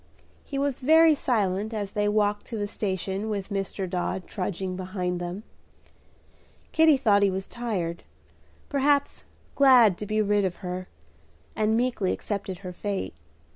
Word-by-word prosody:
He 275 Hz, -, -5 dB
was 280 Hz, -1 st, -1 dB
very 320 Hz, +4 st, +6 dB
silent 215 Hz, -5 st, 0 dB
as 205 Hz, -2 st, -3 dB
they 205 Hz, 0 st, 0 dB
walked 210 Hz, 0 st, +1 dB
to 230 Hz, -, -5 dB
the 205 Hz, -1 st, -2 dB
station 195 Hz, 0 st, -3 dB
with 200 Hz, -2 st, -3 dB
Dr. 195 Hz, -1 st, -3 dB
Dodd 180 Hz, 0 st, -3 dB
trudging 185 Hz, -1 st, -3 dB
behind 180 Hz, -1 st, -3 dB
them. 175 Hz, +4 st, -5 dB, 1.3 s
Kitty 320 Hz, -3 st, +5 dB
thought 210 Hz, -6 st, +3 dB
he 200 Hz, -, +4 dB
was 190 Hz, 0 st, -3 dB
tired, 195 Hz, -9 st, -3 dB, 0.7 s
perhaps 285 Hz, 0 st, +1 dB, 0.3 s
glad 250 Hz, -9 st, +6 dB
to 210 Hz, -, -5 dB
be 215 Hz, +1 st, 0 dB
rid 205 Hz, -1 st, +2 dB
of 185 Hz, -2 st, -1 dB
her, 180 Hz, +1 st, -4 dB, 0.7 s
and 220 Hz, +1 st, +2 dB
meekly 240 Hz, -6 st, 0 dB
accepted 195 Hz, -3 st, -4 dB
her 180 Hz, -, -5 dB
fate. 200 Hz, +1 st, -3 dB
205 Hz, 145 wpm, -26 LUFS, 190-230 Hz, 1.3 s, very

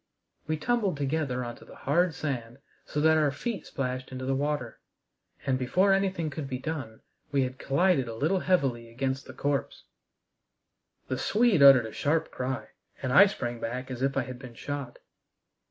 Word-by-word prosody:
We 155 Hz, 0 st, 0 dB
tumbled 210 Hz, -3 st, 0 dB
together 140 Hz, -3 st, -1 dB
on 120 Hz, 0 st, -6 dB
to -, -, -15 dB
the -, -, -14 dB
hard 170 Hz, +4 st, +1 dB
sand 120 Hz, -5 st, -4 dB, 0.3 s
so 150 Hz, -, -2 dB
that 160 Hz, +1 st, +5 dB
our 150 Hz, -2 st, +3 dB
feet 200 Hz, -, -4 dB
splashed 130 Hz, -1 st, -3 dB
into 130 Hz, 0 st, -5 dB
the 135 Hz, -, +1 dB
water. 140 Hz, -4 st, -2 dB, 0.7 s
And, 130 Hz, -2 st, +1 dB
before 185 Hz, +10 st, +3 dB
anything 190 Hz, -5 st, 0 dB
could 145 Hz, -1 st, -5 dB
be 130 Hz, -, -2 dB
done, 130 Hz, -6 st, -5 dB, 0.3 s
we 140 Hz, -2 st, +3 dB
had 130 Hz, 0 st, -5 dB
collided 140 Hz, -1 st, +2 dB
a 115 Hz, -, -5 dB
little 160 Hz, +10 st, +1 dB
heavily 135 Hz, -11 st, +1 dB
against 130 Hz, +3 st, -2 dB
the -, -, -9 dB
corpse. 140 Hz, -2 st, -2 dB, 1.2 s
The -, -, -2 dB
Swede 215 Hz, -6 st, +3 dB
uttered 135 Hz, -4 st, +9 dB
a 110 Hz, -, -6 dB
sharp 155 Hz, +2 st, 0 dB
cry. 130 Hz, +1 st, -4 dB, 0.3 s
And 130 Hz, -1 st, 0 dB
I 195 Hz, +9 st, +9 dB
sprang 120 Hz, -, -4 dB
back 125 Hz, +3 st, -4 dB
as 125 Hz, -1 st, -5 dB
if 135 Hz, +1 st, 0 dB
I 135 Hz, -, +2 dB
had 125 Hz, 0 st, -8 dB
been 125 Hz, -3 st, -10 dB
shot. 140 Hz, -1 st, -5 dB
140 Hz, 180 wpm, -28 LUFS, 125-160 Hz, 1.2 s, uttered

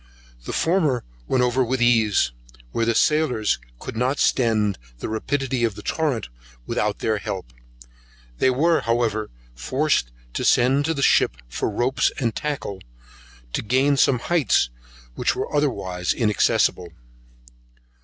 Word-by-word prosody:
The -, -, -4 dB
former 160 Hz, -8 st, +1 dB, 0.2 s
went 130 Hz, -1 st, +2 dB
over 125 Hz, +1 st, +2 dB
with 130 Hz, +2 st, -1 dB
ease, 110 Hz, -, +3 dB, 0.4 s
where 115 Hz, 0 st, 0 dB
the 115 Hz, -, +2 dB
sailors 130 Hz, -, +2 dB, 0.2 s
could -, -, -8 dB
not 125 Hz, +4 st, 0 dB
stem 110 Hz, -5 st, +2 dB, 0.2 s
the -, -, -5 dB
rapidity 130 Hz, +2 st, -1 dB
of 115 Hz, -4 st, 0 dB
the -, -, -10 dB
torrent 145 Hz, -, -1 dB, 0.4 s
without 105 Hz, +8 st, -1 dB
their 110 Hz, -2 st, -1 dB
help. 90 Hz, -11 st, -6 dB, 0.9 s
They 130 Hz, -, +4 dB
were, 160 Hz, +6 st, +2 dB
however, 115 Hz, -2 st, 0 dB, 0.2 s
forced 100 Hz, -, 0 dB, 0.2 s
to -, -, -2 dB
send 135 Hz, +4 st, +3 dB
to 165 Hz, +1 st, 0 dB
the 140 Hz, -, -1 dB
ship -, -, +3 dB
for -, -, -2 dB
ropes 120 Hz, +5 st, +1 dB
and 115 Hz, -4 st, -1 dB
tackles 140 Hz, -10 st, -4 dB, 0.7 s
to -, -, 0 dB
gain 130 Hz, +5 st, +2 dB
some 135 Hz, -1 st, +3 dB
heights 130 Hz, -, +1 dB, 0.4 s
which -, -, 0 dB
were -, -, -3 dB
otherwise 95 Hz, -11 st, 0 dB
inaccessible. 105 Hz, -5 st, +1 dB
120 Hz, 135 wpm, -23 LUFS, 105-135 Hz, 0.9 s, They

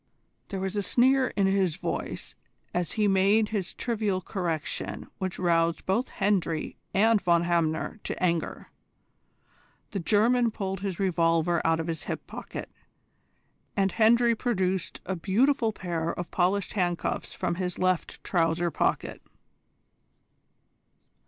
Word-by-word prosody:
There 195 Hz, -, -4 dB
was 190 Hz, +1 st, -3 dB
a 205 Hz, -, +1 dB
sneer 260 Hz, +6 st, +4 dB
in 200 Hz, -, +3 dB
his 190 Hz, -4 st, +2 dB
voice -, -, -4 dB, 0.4 s
as 175 Hz, -2 st, -1 dB
he 215 Hz, -2 st, +2 dB
made 200 Hz, +3 st, +3 dB
this 200 Hz, -4 st, -2 dB
trivial 215 Hz, -5 st, -1 dB
correction 175 Hz, -5 st, -3 dB
which 185 Hz, -2 st, -3 dB
roused 170 Hz, -2 st, +1 dB
both 225 Hz, +7 st, 0 dB
Hendry 180 Hz, -6 st, 0 dB, 0.2 s
and 220 Hz, +1 st, +4 dB
Von 170 Hz, -2 st, +3 dB
Hamner 170 Hz, +3 st, 0 dB
to -, -, -4 dB
anger. 170 Hz, -2 st, -1 dB, 1.2 s
The 200 Hz, -, -2 dB
German 230 Hz, +6 st, +3 dB
pulled 195 Hz, -3 st, -4 dB
his 195 Hz, -3 st, -4 dB
revolver 170 Hz, -2 st, +2 dB
out 165 Hz, 0 st, +2 dB
of 165 Hz, -, -2 dB
his 165 Hz, -1 st, -4 dB
hip -, -, -4 dB
pocket, -, -, -7 dB, 1.1 s
and 195 Hz, -1 st, +2 dB
Hendry 235 Hz, +1 st, +4 dB
produced 190 Hz, -6 st, -1 dB
a 190 Hz, -, -2 dB
beautiful 225 Hz, -, +2 dB
pair 170 Hz, -5 st, -3 dB
of 175 Hz, 0 st, -6 dB
polished 190 Hz, +2 st, +1 dB
handcuffs 175 Hz, -4 st, -1 dB
from -, -, -1 dB
his 180 Hz, -1 st, -2 dB
left 185 Hz, -1 st, -1 dB
trouser 170 Hz, -1 st, +1 dB
pocket. -, -, -1 dB
190 Hz, 130 wpm, -27 LUFS, 170-210 Hz, 1.2 s, sneer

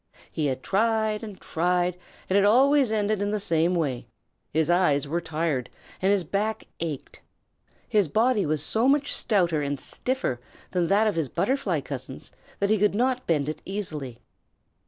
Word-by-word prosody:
He 155 Hz, -2 st, -1 dB
had 130 Hz, -1 st, -3 dB
tried 220 Hz, 0 st, +1 dB
and 210 Hz, -4 st, -8 dB
tried, 180 Hz, +1 st, 0 dB, 0.3 s
and 190 Hz, -, 0 dB
it 200 Hz, -, +5 dB
always 265 Hz, +4 st, +4 dB
ended 210 Hz, -1 st, 0 dB
in 205 Hz, -, 0 dB
the 210 Hz, 0 st, -1 dB
same 170 Hz, -1 st, +2 dB
way 140 Hz, -8 st, -2 dB, 0.4 s
his 160 Hz, 0 st, +1 dB
eyes 160 Hz, -5 st, +2 dB
were 170 Hz, +4 st, -1 dB
tired 155 Hz, -6 st, -2 dB, 0.3 s
and 190 Hz, +1 st, +3 dB
his 200 Hz, -3 st, +2 dB
back 205 Hz, +6 st, -2 dB, 0.2 s
ached. 160 Hz, -5 st, -5 dB, 0.7 s
His 205 Hz, -5 st, +2 dB
body 220 Hz, -, +2 dB
was 150 Hz, -1 st, 0 dB
so 225 Hz, +8 st, +2 dB
much 285 Hz, +1 st, +2 dB
stouter 175 Hz, -8 st, +2 dB
and 140 Hz, -1 st, -2 dB
stiffer 250 Hz, -, -2 dB, 0.3 s
than 180 Hz, -2 st, +1 dB
that 205 Hz, +4 st, +3 dB
of 215 Hz, -, +2 dB
his 160 Hz, -6 st, -2 dB
butterfly 205 Hz, -, 0 dB
cousins 130 Hz, -1 st, -7 dB, 0.3 s
that 200 Hz, +1 st, 0 dB
he 215 Hz, -, +3 dB
could 210 Hz, 0 st, +2 dB
not 255 Hz, +2 st, 0 dB
bend 150 Hz, -4 st, +1 dB
it 155 Hz, 0 st, -4 dB
easily. 155 Hz, -, -5 dB
185 Hz, 170 wpm, -26 LUFS, 155-215 Hz, 0.7 s, it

